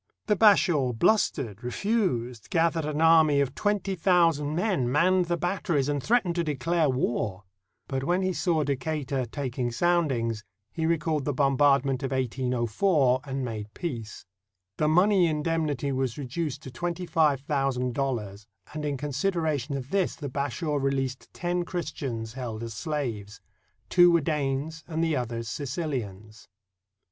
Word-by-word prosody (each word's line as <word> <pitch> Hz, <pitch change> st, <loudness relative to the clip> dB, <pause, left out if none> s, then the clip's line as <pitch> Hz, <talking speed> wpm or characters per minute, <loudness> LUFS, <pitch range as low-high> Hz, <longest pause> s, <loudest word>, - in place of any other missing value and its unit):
The 210 Hz, -, +2 dB
Bashaw 175 Hz, -, +4 dB
blustered, 115 Hz, -, +1 dB
refused, 125 Hz, -, -1 dB
gathered 165 Hz, -1 st, +1 dB
an 150 Hz, +1 st, -2 dB
army 160 Hz, -3 st, +5 dB
of 135 Hz, -2 st, 0 dB
twenty 205 Hz, +2 st, -1 dB
thousand 165 Hz, -5 st, +2 dB
men, 175 Hz, -, 0 dB
manned 180 Hz, +5 st, +3 dB
the 170 Hz, 0 st, -1 dB
batteries, 170 Hz, -6 st, 0 dB
and 145 Hz, -1 st, -1 dB
threatened 215 Hz, -, +2 dB
to 170 Hz, -, +2 dB
declare 155 Hz, +1 st, 0 dB
war. 115 Hz, -6 st, -1 dB, 0.4 s
But 135 Hz, -1 st, -2 dB
when 180 Hz, +6 st, +1 dB
he 185 Hz, 0 st, 0 dB
saw 165 Hz, -3 st, +1 dB
Deca 145 Hz, +2 st, -2 dB
tur 135 Hz, -2 st, -1 dB
taking 125 Hz, 0 st, -3 dB
soundings, 125 Hz, -8 st, +1 dB, 0.3 s
he 160 Hz, -1 st, -1 dB
recalled 160 Hz, -3 st, 0 dB
the 145 Hz, -, 0 dB
bombardment 140 Hz, -1 st, +3 dB
of 135 Hz, -, -2 dB
1804 130 Hz, -, +1 dB
and 135 Hz, -1 st, -3 dB
made 105 Hz, -3 st, -5 dB
peace. 120 Hz, -11 st, -5 dB, 0.5 s
The 155 Hz, -, +1 dB
money 180 Hz, +3 st, +4 dB
indemnity 150 Hz, -3 st, -1 dB
was 130 Hz, -3 st, -1 dB
reduced 145 Hz, +2 st, -4 dB
to 130 Hz, -, -8 dB
twenty 175 Hz, +7 st, -3 dB
five 150 Hz, -5 st, +2 dB
thousand 135 Hz, -3 st, -1 dB
dollars, 110 Hz, -6 st, -3 dB, 0.3 s
and 155 Hz, 0 st, -4 dB
in 145 Hz, -2 st, -1 dB
consid 150 Hz, +7 st, -1 dB
eration 150 Hz, -4 st, -1 dB
of 130 Hz, +1 st, -8 dB
this 195 Hz, -3 st, +1 dB
the 145 Hz, -3 st, -6 dB
Bashaw 145 Hz, +3 st, -2 dB
released 135 Hz, -1 st, -2 dB
ten 175 Hz, 0 st, -2 dB
Christians 140 Hz, -10 st, -4 dB
held 120 Hz, -4 st, -5 dB
as 115 Hz, -1 st, -5 dB
slaves. 110 Hz, -7 st, -4 dB, 0.5 s
Two 175 Hz, -1 st, +6 dB
were 170 Hz, -1 st, +4 dB
Danes 150 Hz, +1 st, -2 dB
and 160 Hz, -1 st, -1 dB
the 160 Hz, -2 st, +1 dB
others 115 Hz, -2 st, -3 dB
Sicilians. 115 Hz, -, -5 dB
145 Hz, 150 wpm, -27 LUFS, 125-165 Hz, 0.5 s, Two